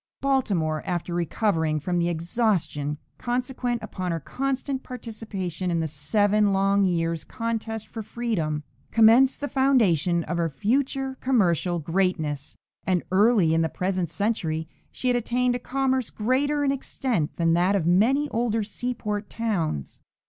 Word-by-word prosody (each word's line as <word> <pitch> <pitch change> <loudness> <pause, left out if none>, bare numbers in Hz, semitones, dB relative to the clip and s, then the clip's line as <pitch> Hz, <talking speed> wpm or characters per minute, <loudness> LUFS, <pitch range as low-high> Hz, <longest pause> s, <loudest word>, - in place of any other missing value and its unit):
Baltimore, 195 - +1
after 175 -1 -3
recovering 165 -3 0
from 175 +3 -1
the 170 0 +1
exhaustion 170 -4 -1 0.2
consequent 245 -1 -2
upon 185 -2 -4
her 165 - -1
constant 265 - -2
participation 215 -8 -5
in 170 -1 +1
the 160 - 0
seven 205 +8 +2
long 195 +1 +3
years' 165 -2 0
contest 225 -1 -4
for 225 - -6
freedom, 200 -10 -2 0.3
commenced 230 +5 +5
the 290 - -1
foundation 195 - +3
of 175 - -3
her 165 -1 +1
future 265 - -1
commercial 180 - +2
greatness, 160 -4 -1 0.3
and 180 -2 +1
early 200 -4 +4
in 165 - +3
the 160 - +1
present 185 -1 -1
century 165 -6 -1 0.2
she 255 - -4
had 250 - +3
attained 245 +1 +1
a 245 - -2
commerce 260 -1 0
greater 280 +6 0
in 275 - +2
extent 255 - -2
than 165 -1 +2
that 180 +4 +3
of 185 -5 0
many 230 - +3
older 225 -2 0
seaport 210 -2 -4
towns. 175 - -2
205 Hz, 140 wpm, -25 LUFS, 170-245 Hz, 0.3 s, commenced